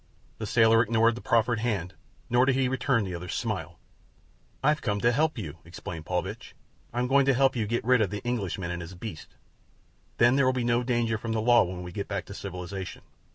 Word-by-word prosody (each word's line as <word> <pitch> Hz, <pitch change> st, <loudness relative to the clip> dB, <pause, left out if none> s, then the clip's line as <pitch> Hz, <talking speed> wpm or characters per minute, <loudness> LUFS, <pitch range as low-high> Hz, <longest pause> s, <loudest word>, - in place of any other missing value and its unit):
The 110 Hz, -, -4 dB
sailor 115 Hz, 0 st, +5 dB
ignored 115 Hz, 0 st, +3 dB
the 120 Hz, -, -8 dB
proffered 115 Hz, 0 st, +2 dB
hand, 100 Hz, -6 st, -2 dB, 0.3 s
nor 125 Hz, +2 st, +3 dB
did 135 Hz, -, +3 dB
he 130 Hz, -1 st, +2 dB
return 125 Hz, -2 st, +1 dB
the 95 Hz, -2 st, -4 dB
other's 90 Hz, 0 st, -5 dB
smile. -, -, -3 dB, 0.9 s
"I've 150 Hz, +2 st, +3 dB
come 105 Hz, -3 st, -1 dB
to 120 Hz, -, +4 dB
help 155 Hz, +4 st, +1 dB
you," 85 Hz, -7 st, -6 dB
explained 85 Hz, -1 st, -8 dB
Paulvitch. 95 Hz, +6 st, -4 dB, 0.4 s
"I'm 120 Hz, +1 st, -1 dB
going 135 Hz, +1 st, +3 dB
to 135 Hz, -, +4 dB
help 135 Hz, +1 st, +3 dB
you 110 Hz, -3 st, -1 dB
get 115 Hz, +1 st, -1 dB
rid 125 Hz, -1 st, +4 dB
of 105 Hz, -, +2 dB
the 105 Hz, +1 st, -5 dB
Englishman 100 Hz, -7 st, -2 dB
and 90 Hz, 0 st, -4 dB
his 85 Hz, +2 st, -9 dB
beasts—then 115 Hz, +5 st, -4 dB
there 135 Hz, -2 st, +4 dB
will 130 Hz, -, +3 dB
be 125 Hz, -1 st, -1 dB
no 120 Hz, 0 st, +2 dB
danger 120 Hz, -3 st, 0 dB
from 115 Hz, +1 st, -3 dB
the 110 Hz, -, 0 dB
law 120 Hz, +1 st, +6 dB
when 90 Hz, 0 st, -6 dB
we 90 Hz, -, -7 dB
get 100 Hz, +2 st, -4 dB
back 100 Hz, -3 st, -3 dB
to -, -, -9 dB
civilization. 95 Hz, -1 st, -6 dB
115 Hz, 210 wpm, -27 LUFS, 95-120 Hz, 0.9 s, law